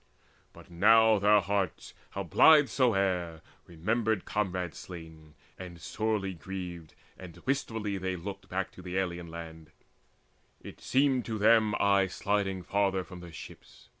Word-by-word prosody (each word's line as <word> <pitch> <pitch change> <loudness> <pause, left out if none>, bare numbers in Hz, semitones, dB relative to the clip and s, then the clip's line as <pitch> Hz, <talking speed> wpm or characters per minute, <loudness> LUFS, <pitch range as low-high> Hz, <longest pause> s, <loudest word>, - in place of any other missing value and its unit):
But - - -16
now 110 +4 +5
their 105 +1 +5
hearts, 100 0 -2 0.2
How 100 - -5
blithe 145 - +6
soe'er, 95 - 0 0.3
remembered 110 +5 -1
comrades 90 -5 -2
slain, 80 -3 -11 0.2
And 90 -2 -9
sorely 105 -1 -2
grieved, 90 -1 -8 0.2
and 90 -3 -11
wistfully 110 -7 -2
they 95 0 -2
looked 95 +1 -8
Back 95 +1 -3
to - - -13
the 90 +1 -5
alien's 85 -2 -3
land; 80 -1 -9 0.9
it - - -12
seemed 135 -1 +2
to 110 -2 -3
them 110 0 +4
Aye 100 -1 +3
sliding 95 0 -2
farther 95 0 0
from 90 -1 -11
their 85 -1 -11
ships. - - -13
95 Hz, 135 wpm, -29 LUFS, 85-105 Hz, 0.9 s, blithe